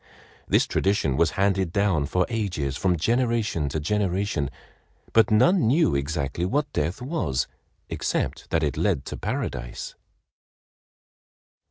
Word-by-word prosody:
This - - +3
tradition 95 -9 +1
was 80 +3 +3
handed 95 -3 +2
down 95 -7 +1
for 90 +3 +1
ages 90 - -2
from 90 +3 +1
generation 115 - +1
to 80 - -2
generation—but 100 +3 -1
none 125 - +4
knew 155 +6 +3
exactly 70 +2 -2
what 140 +10 0
death 80 +10 -2
was 125 - -1 0.4
except - - -2
that 80 -1 +1
it 70 -4 -1
led 65 - +1
to - - -5
Paradise. - - -4
90 Hz, 120 wpm, -25 LUFS, 75-110 Hz, 0.4 s, none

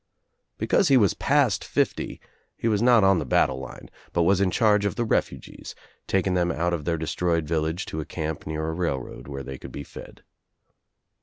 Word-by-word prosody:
Because 195 - +2
he 135 -3 +6
was 105 -5 +4
past 140 -7 +2
fifty - - -1 0.4
he - - -2
was 105 -2 +2
not 120 -3 +5
on 95 -2 +4
the - - -2
battle 65 +1 +2
line, 65 - -9 0.3
but 85 - +2
was 95 +3 +3
In 95 - +3
charge 105 +1 +3
of 100 - -1
the 120 - -1
refugees, - - -3 0.3
taking 95 -1 +1
them 90 -1 +1
out 85 +1 -1
of 80 -4 -3
their 85 -1 0
destroyed 85 +1 -1
village 80 +3 -1
to 80 - -5
a 75 - -4
camp 80 -2 -5
near 80 0 -3
a 80 - -2
railroad 70 -7 -4
where 70 -1 -6
they 65 -1 -8
could - - -10
be 70 - -6
fed. - - -12
85 Hz, 200 wpm, -25 LUFS, 80-100 Hz, 0.4 s, he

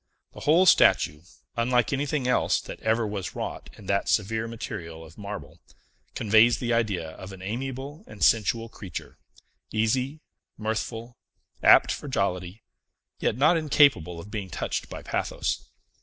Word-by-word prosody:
The - - -10
whole 165 +5 +4
statue 75 - +5 0.3
unlike 120 +1 +2
anything 140 -1 -1
else 125 - +2
that - - -9
ever 110 +1 +1
was 100 -4 -4
wrought - - -5
in 105 - -13
that 100 +1 0
severe 110 +2 +1
material 90 -8 -7
of 80 +1 -15
marble 85 -6 -8 0.5
conveys 110 +2 +5
the 120 0 -1
idea 100 -9 0
of 95 +3 -10
an 95 -1 -10
amiable 135 - -5
and 105 - -6
sensual 115 +1 +3
creature, 95 -6 -8 0.5
easy, 130 +7 0 0.4
mirthful, 115 +2 -4 0.4
apt - - +7
for - - -5
jollity, 95 -4 -2 0.6
yet 110 - 0
not 155 +6 +5
incapable 140 - +3
of 100 +5 -10
being 100 -3 -4
touched - - -3
by - - -8
pathos. - - -2
110 Hz, 140 wpm, -26 LUFS, 95-125 Hz, 0.6 s, apt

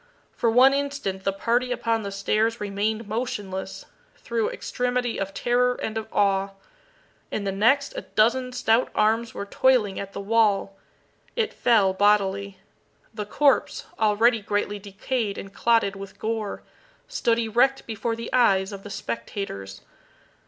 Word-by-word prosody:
For 235 - 0
one 255 +4 +6
instant 275 -10 -3
the 195 - +2
party 240 +5 0
upon 230 -2 0
the 200 -1 -5
stairs 215 +3 0
remained 210 +2 -2
motionless, 205 -4 -4 0.3
through 230 -2 -1
extremity 245 -1 -2
of 195 0 -3
terror 245 +4 +1
and 220 - -4
of 220 0 -3
awe. 195 -1 +1 0.8
In 210 - -3
the 195 - -1
next 265 +9 +2
a - - -3
dozen 250 +4 +1
stout 245 -1 +2
arms 225 +2 +1
were 200 - -4
toiling 215 -2 +2
at 195 0 -7
the - - -5
wall. 200 -2 +2 0.6
It 455 -3 0
fell 210 -6 +3
bodily. 200 -1 +2 0.6
The 210 -2 -5
corpse, 280 +5 +2
already 220 +2 +3
greatly 205 0 -2
decayed 205 +2 -3
and 195 0 -8
clotted 225 -4 +2
with 195 0 -9
gore, 220 -2 -3 0.4
stood 235 - +1
erect 240 +4 +2
before 225 +1 -3
the 230 0 -7
eyes 195 -6 +3
of 200 -1 -7
the 205 - -10
spectators. 115 - -5
215 Hz, 145 wpm, -25 LUFS, 200-240 Hz, 0.8 s, one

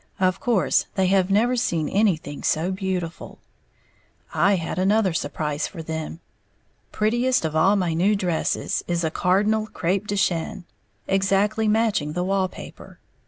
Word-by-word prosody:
Of 185 0 +1
course 235 -6 +1
they 190 - +2
have 190 -1 +2
never 230 +6 +3
seen 170 -10 0
anything 165 -8 0
so 165 +4 0
beautiful. 185 -3 -4 1.0
I 200 0 +3
had 170 0 -3
another 195 0 +2
surprise 150 -1 -2
for 165 -4 -8
them. 160 +1 -5 0.7
Prettiest 240 0 +1
of 155 -1 -3
all 190 +6 +4
my 180 -4 0
new 190 +6 +2
dresses 180 -5 -1
is 175 -1 -1
a 160 - 0
cardinal 210 +6 +1
crêpe 195 +1 -2
de 205 - -2
chine, 175 -2 -1 0.4
exactly 195 +3 +1
matching 210 -9 +1
the 180 - -1
wall 190 0 +1
paper. - - -12
190 Hz, 145 wpm, -23 LUFS, 165-205 Hz, 1.0 s, all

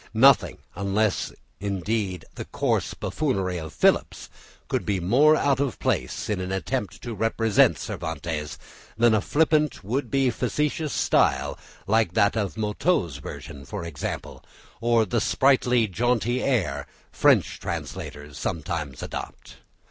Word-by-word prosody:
Nothing, 135 +3 +5 0.2
unless 100 +2 0 0.3
indeed 100 -2 -2
the - - -6
coarse - - -1
buffoonery 95 - -1
of 80 -2 -7
Phillips, - - +1 0.4
could - - -1
be 100 -2 0
more 135 - +5
out 140 -3 +2
of 140 -6 -1
place - - -1
in 105 -3 -1
an 90 0 -4
attempt 105 +3 -3
to 120 - -4
represent 115 0 +3
Cervantes, 80 -3 -4 0.4
than 115 0 +5
a 110 - +3
flippant, 150 -1 +1
would 125 +9 -2
be 135 -2 +2
facetious 150 +4 -1
style, - - +2 0.3
like 110 -4 +2
that 100 +2 +3
of 105 -2 -2
Motteux's 105 - 0
version 70 +1 -9
for 100 +1 -6
example, 80 -5 -5 0.4
or 115 -1 +3
the 115 +2 0
sprightly, 125 -2 +3
jaunty 120 +4 0
air, 85 - 0 0.2
French - - +3
translators 75 -1 -6
sometimes 75 -4 -3
adopt. - - -7
105 Hz, 130 wpm, -25 LUFS, 90-125 Hz, 0.4 s, Nothing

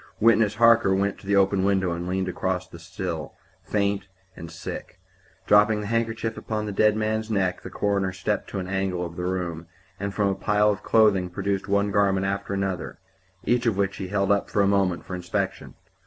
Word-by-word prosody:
Witness 110 -1 +4
Harker 115 -4 +5
went 100 +1 -1
to - - -14
the 100 - +2
open 100 -1 +3
window 95 -2 +2
and 85 +1 -4
leaned 95 +1 -1
out - - -1
across 95 0 -2
the 85 - -12
sill, 85 -1 -5 0.3
faint 100 -1 -1 0.3
and 85 - -9
sick. 85 - -8 0.5
Dropping 105 +1 +4
the - - -5
handkerchief 115 0 -1
upon 110 -1 -3
the 105 - -3
dead 105 +1 +3
man's 110 0 -1
neck, 95 -4 0
the - - -8
coroner 100 -2 0
stepped 95 - -2
to - - -5
an 95 -1 -3
angle 95 -2 -1
of 85 0 -8
the 90 - -4
room, 90 -3 -3 0.3
and 100 +1 -2
from 100 0 +1
a - - +1
pile 105 +2 +2
of 105 0 -4
clothing 105 -6 +3
produced 95 +2 -2
one 100 0 +1
garment 95 -1 +2
after 100 0 -2
another, 95 -2 -3 0.5
each 120 0 +1
of 110 -4 +1
which 100 -1 0
he 95 - -4
held 100 0 +1
up 100 - 0
a 100 -1 +4
moment 95 -3 +1
for - - -7
inspection. 90 -1 -3
100 Hz, 200 wpm, -25 LUFS, 95-105 Hz, 0.5 s, Harker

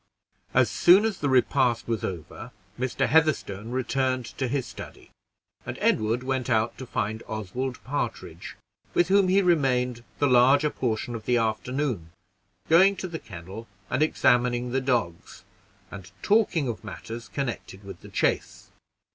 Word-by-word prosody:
As - - +5
soon 190 +4 +5
as 220 -4 -2
the 145 - 0
repast 130 -2 +2
was 115 -2 -2
over, 90 +7 -6 0.3
Mr. 130 0 0
Heatherstone 125 -9 +1
returned 130 0 -1
to 130 - 0
his 130 0 -1
study, - - -11 0.5
and - - -6
Edward 110 +3 +1
went 130 -1 -2
out 115 -1 +1
to 130 - -7
find 110 +1 -2
Oswald 115 +5 -4
Partridge, 145 +3 -5 0.4
with 175 0 +3
whom 195 -1 +4
he 195 +2 +3
remained 125 -8 +1
the 145 - +2
larger 135 +3 +5
portion 120 -1 -2
of 110 -2 -7
the 125 - +3
afternoon, 115 - -2 0.5
going 190 +5 +6
to 190 0 -5
the 165 -2 -6
kennel 95 +4 -10 0.2
and - - 0
examining 125 -5 +2
the 135 +1 0
dogs, 115 -12 -2 0.5
and 95 -3 -9
talking 200 -9 +2
of 115 -1 -5
matters 115 +1 -8
connected 105 -3 -5
with 100 - -10
the - - -12
chase. - - -1
125 Hz, 145 wpm, -26 LUFS, 110-145 Hz, 0.5 s, going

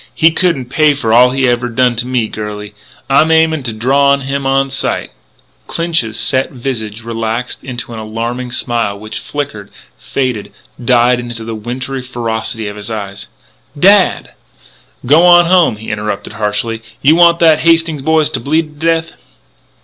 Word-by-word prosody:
He 160 +1 +4
couldn't 160 -8 0
pay 155 -2 +3
for 115 -5 -1
all 125 +2 +6
he 130 0 0
ever 120 0 0
done 125 +1 +1
to 120 +2 -2
me, 125 -3 0
girlie.... 105 -1 -7 0.3
I'm 140 +3 +3
aimin' 160 -1 +3
to 115 - -2
draw 135 +6 +2
on 140 0 +2
him 135 0 -3
on 135 0 +1
sight 135 - -2 0.3
" - - -39
Clinch's 165 -10 -1
set 130 0 +1
visage 115 -4 -5
relaxed 115 +1 -4
into 120 -2 -6
an 110 - -6
alarming 115 +3 -4
smile 120 -5 -1
which 110 +1 -7
flickered, 135 -9 -5 0.3
faded, 125 -6 -3 0.3
died 120 0 +3
in 120 - -6
the 115 -1 -6
wintry 125 +4 -5
ferocity 115 -3 -4
of 105 0 -7
his 105 +2 -7
eyes. 100 -3 -6 0.5
"Dad 195 +2 +4 0.4
" - - -23
"G'wan 175 +5 +6
home!" 175 -8 +3
he 110 +1 -7
interrupted 105 -1 -4
harshly. 110 +1 -2 0.2
"You 150 +4 +5
want 170 0 +5
that 160 -3 +4
Hastings 165 -2 +2
boy 160 +2 +2
to 150 -3 -1
bleed 150 +3 -2
to 165 - 0
death?" 165 0 0
125 Hz, 165 wpm, -14 LUFS, 115-150 Hz, 0.5 s, all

